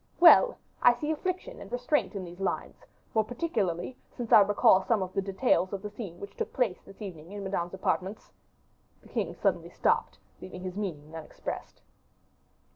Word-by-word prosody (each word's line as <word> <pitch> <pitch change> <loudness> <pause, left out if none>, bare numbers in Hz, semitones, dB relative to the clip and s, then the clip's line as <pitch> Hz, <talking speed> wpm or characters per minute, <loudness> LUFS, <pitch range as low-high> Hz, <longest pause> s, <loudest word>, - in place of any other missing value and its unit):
"Well! 420 +8 +8 0.2
I 245 - +7
see 300 +5 -2
affliction 370 +9 -3
and - - -10
restraint 250 +1 0
in 190 -2 -4
these 175 +1 -11
lines; 195 - -3 0.3
more 220 - +3
particularly 225 - -2 0.2
since 240 -2 -5
I - - +10
recall 200 -2 +5
some 215 -3 +2
of 185 0 -7
the 195 - +1
details 190 -1 +1
of 195 0 -4
the 210 - -5
scene 200 -6 -7
which 200 - -9
took - - -3
place 235 -8 0
this 195 +2 -12
evening 170 -3 -8
in 205 -1 -6
Madame's 190 -2 -2
apartments 190 +2 -2 0.4
" - - -38
The - - -17
king - - -2
suddenly - - 0
stopped, - - +1 0.2
leaving 180 0 -8
his 185 -1 -5
meaning 165 -7 -5
unexpressed. 160 -1 -7
200 Hz, 180 wpm, -29 LUFS, 185-245 Hz, 0.4 s, I